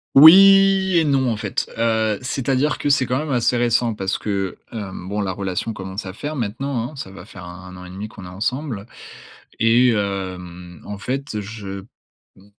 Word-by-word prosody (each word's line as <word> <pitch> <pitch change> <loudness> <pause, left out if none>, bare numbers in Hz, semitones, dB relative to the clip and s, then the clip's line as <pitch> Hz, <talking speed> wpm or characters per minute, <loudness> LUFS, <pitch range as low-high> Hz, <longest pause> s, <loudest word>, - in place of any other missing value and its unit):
Oui 195 +4 +8
et 165 - +4
non 135 -4 +2
en 110 - -2
fait. 100 -2 -3
Heu, 110 -2 +1
c'est-à-dire 135 +3 0
que 145 - -1
c'est 140 -2 +3
quand 130 +3 -1
même 155 -1 -4
assez 125 0 +2
récent 120 -1 +2
parce 95 -2 -2
que, 100 -3 -3
hem, 95 -5 -7
bon 105 +1 -2
la 95 -2 -1
relation 95 +3 -3
commence 95 +1 -6
à 95 - -6
faire 150 +8 -5
maintenant, 120 +2 -3
hein. - - -13
Ça 95 -8 -7
va 95 -1 -11
faire 90 -4 -12
1- 90 0 -9
1 90 0 -10
an 90 - -10
et - - -10
demi 100 +4 -6
qu'on 95 - -12
est - - -8
ensemble 110 +3 -3 0.7
et, 120 +2 +5
hem, 90 -4 -4
en 105 -1 -6
fait 130 -2 -3
je 100 -2 -7
p 100 - -18 0.5
m 95 - -19
110 Hz, 200 wpm, -21 LUFS, 95-130 Hz, 0.7 s, Oui